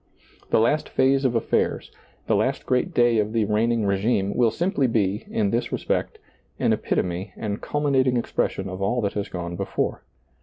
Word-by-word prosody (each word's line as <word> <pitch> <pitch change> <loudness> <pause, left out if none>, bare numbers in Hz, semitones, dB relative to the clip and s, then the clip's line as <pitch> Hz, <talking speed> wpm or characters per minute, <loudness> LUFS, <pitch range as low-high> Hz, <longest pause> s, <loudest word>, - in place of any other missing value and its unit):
The - - +3
last 150 +7 +1
phase 135 +1 +2
of 125 - +2
aflairs, 115 - 0 0.3
the - - +2
last - - 0
great 125 -1 +1
day 120 -2 +3
of 105 +1 -1
the 115 -2 +2
reigning 110 +2 +1
regime, 100 0 +1
will 120 -2 +4
simply 170 - 0
be, 105 -3 0
in 100 -2 0
this 120 +1 -1
respect, - - -2 0.4
an - - +2
epitome 90 +2 -2
and 105 -1 -4
culminating 135 -4 +1
expression 95 -4 -1
of 95 0 -6
all 120 +5 +1
that 100 -2 -1
has 100 -1 -3
gone 85 -1 -5
before. - - -2
110 Hz, 175 wpm, -24 LUFS, 100-125 Hz, 0.4 s, will